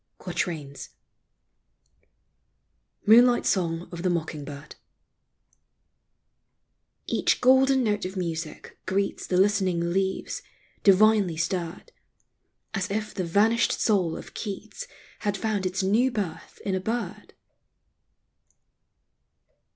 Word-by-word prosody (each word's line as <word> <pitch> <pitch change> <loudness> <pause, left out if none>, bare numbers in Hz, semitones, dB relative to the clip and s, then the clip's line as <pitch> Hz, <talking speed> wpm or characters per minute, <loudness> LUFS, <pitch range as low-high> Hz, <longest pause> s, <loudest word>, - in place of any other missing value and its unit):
QUATRAINS. 145 -6 -4 2.2
MOONLIGHT 240 +3 +6
SONG 170 -2 0
OF 170 -1 -6
THE 185 - +1
MOCKING 160 -3 -2
BIRD. 145 +1 -9 2.3
Each - - +1
golden 265 +1 +5
note 210 -2 0
of 190 +1 -5
music 165 -3 -5
greets 195 +1 -1
The 180 - +1
listening 185 -4 +2
leaves, 190 0 -1 0.4
divinely 200 -3 +5
stirred, 175 - -3 0.8
As 195 -3 -2
if 210 +1 -3
the 185 - -2
vanished 215 +7 +3
soul 185 -7 +1
of - - -11
Keats 215 - -6 0.3
Had 205 -1 -1
found 205 -2 -1
its 185 +1 -2
new 220 +7 +3
birth 200 -9 -5
in 195 - 0
a 190 - 0
bird. 215 -1 -4
190 Hz, 100 wpm, -26 LUFS, 170-215 Hz, 2.3 s, MOONLIGHT